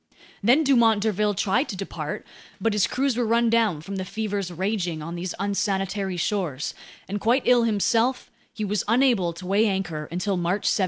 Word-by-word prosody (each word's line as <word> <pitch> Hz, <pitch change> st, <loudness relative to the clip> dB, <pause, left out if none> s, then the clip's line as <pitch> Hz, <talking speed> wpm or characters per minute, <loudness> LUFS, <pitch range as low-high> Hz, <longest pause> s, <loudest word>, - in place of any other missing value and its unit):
Then 250 Hz, +9 st, +4 dB
Dumont 230 Hz, -7 st, +4 dB
d'Urville 210 Hz, -1 st, +1 dB
tried 225 Hz, +9 st, +1 dB
to 200 Hz, -, -4 dB
depart; 195 Hz, +1 st, -5 dB, 0.3 s
but 225 Hz, -1 st, +1 dB
his 205 Hz, -2 st, +2 dB
crews 270 Hz, -1 st, 0 dB
were 245 Hz, -, +1 dB
run 230 Hz, 0 st, +2 dB
down 220 Hz, -9 st, +2 dB
from 195 Hz, +5 st, -6 dB
the 190 Hz, -, -2 dB
fevers 205 Hz, -1 st, -3 dB
raging 180 Hz, -3 st, -2 dB
on 165 Hz, +2 st, -6 dB
these 175 Hz, +1 st, -4 dB
unsanitary 195 Hz, -1 st, -1 dB
shores, 170 Hz, -6 st, -2 dB, 0.3 s
and 205 Hz, +1 st, -4 dB
quite 245 Hz, +4 st, +2 dB
ill 245 Hz, -2 st, +5 dB
himself, 230 Hz, +4 st, +1 dB, 0.2 s
he 215 Hz, -, -4 dB
was 205 Hz, -1 st, -1 dB
unable 230 Hz, -6 st, +3 dB
to 170 Hz, +2 st, -10 dB
weigh 200 Hz, +4 st, +3 dB
anchor 175 Hz, -6 st, -2 dB
until 185 Hz, +3 st, -1 dB
March 175 Hz, +4 st, -1 dB
17. -, -, +2 dB
205 Hz, 180 wpm, -24 LUFS, 185-230 Hz, 0.3 s, ill